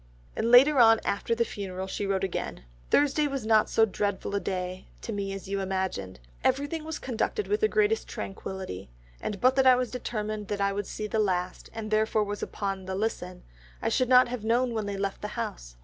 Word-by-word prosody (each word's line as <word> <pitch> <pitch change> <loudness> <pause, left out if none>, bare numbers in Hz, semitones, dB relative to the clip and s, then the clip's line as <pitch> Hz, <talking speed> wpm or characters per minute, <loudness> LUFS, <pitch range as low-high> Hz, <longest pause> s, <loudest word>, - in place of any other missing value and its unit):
And 230 - 0
later 265 +4 +7
on 225 -1 +7
after 215 +3 0
the 235 0 +1
funeral 190 -3 -5
she 195 +1 -3
wrote 195 -1 0
again, 185 - -3 0.3
"Thursday 290 +1 +3
was 275 -5 -4
not 220 -1 +4
so 225 - +4
dreadful 200 -1 -2
a 200 - +1
day 185 0 -4
to 225 - -5
me 200 -1 -3
as 195 -1 -6
you 200 0 -2
imagined.... 185 - -3 0.2
Everything 285 +4 0
was 315 -1 -4
conducted 260 - -2
with 420 +1 0
the 435 - +5
greatest 435 +1 +1
tranquillity, 190 - -6 0.3
and 200 - -4
but 255 +4 +4
that 265 -1 +5
I 255 - +8
was 250 -1 -1
determined 215 -4 -4
that 205 - -3
I 200 0 +1
would 205 0 -3
see 215 - -5
the 220 +1 -1
last, 185 -3 -1
and 220 -1 -6
therefore 215 0 +2
was 205 0 -4
upon 195 -2 -3
the 190 - -2
listen, 190 -3 -3 0.4
I - - 0
should 255 -1 +1
not 255 0 +7
have 240 -3 -5
known 240 +2 +2
when 215 -2 -2
they 200 -1 -3
left 195 0 -3
the - - -3
house. - - -5
210 Hz, 210 wpm, -28 LUFS, 195-250 Hz, 0.4 s, I